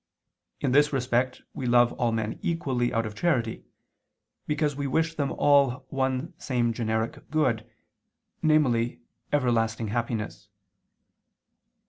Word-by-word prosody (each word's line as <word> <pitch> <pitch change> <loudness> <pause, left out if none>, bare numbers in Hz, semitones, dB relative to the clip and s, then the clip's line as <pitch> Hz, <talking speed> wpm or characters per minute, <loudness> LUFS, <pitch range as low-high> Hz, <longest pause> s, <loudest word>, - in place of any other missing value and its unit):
In 130 - +1
this 145 +2 +4
respect 125 -1 0
we 130 - -4
love 120 0 +4
all 120 -1 0
men 110 -1 -2
equally 130 -8 0
out 115 -1 0
of 110 - -5
charity: 120 -4 0 0.8
because 150 -1 0
we 140 0 -2
wish 160 +4 +1
them 145 -3 -1
all 140 -2 +3
one 130 +3 -1
same 120 -3 0
generic 110 0 -2
good, 120 -8 0 0.7
namely 130 -7 +2 0.3
everlasting 115 -5 +1
happiness. 115 -1 -3
125 Hz, 115 wpm, -27 LUFS, 115-145 Hz, 0.8 s, this